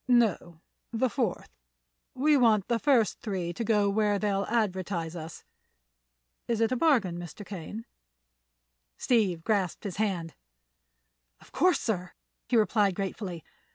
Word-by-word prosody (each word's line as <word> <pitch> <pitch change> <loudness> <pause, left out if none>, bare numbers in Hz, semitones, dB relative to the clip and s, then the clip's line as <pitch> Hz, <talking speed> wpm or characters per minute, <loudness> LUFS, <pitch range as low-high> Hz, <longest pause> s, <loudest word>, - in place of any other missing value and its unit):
"No, 215 -9 +2 0.3
the 235 +1 0
fourth. 235 -9 -2 0.6
We 295 +4 +3
want 225 -7 +4
the 235 -1 +1
first 245 -5 +2
three 185 -5 -3
to 230 - -3
go 210 -2 +2
where 205 0 +2
they'll 200 -1 0
advertise 185 -6 -1
us. 160 -1 -8 1.0
Is 230 -2 0
it 225 +1 +2
a - - +2
bargain, 235 - +2
Mr. 175 +4 -9
Kane?" 205 +4 -7 1.1
Steve 195 -9 +1
grasped 195 -5 0
his 195 -4 -5
hand. 185 -6 -1 1.1
"Of - - -19
course, 365 0 +3
sir," 180 -5 -3 0.4
he 245 - +3
replied 210 -3 +3
gratefully. 190 -4 -4
205 Hz, 130 wpm, -28 LUFS, 180-230 Hz, 1.1 s, want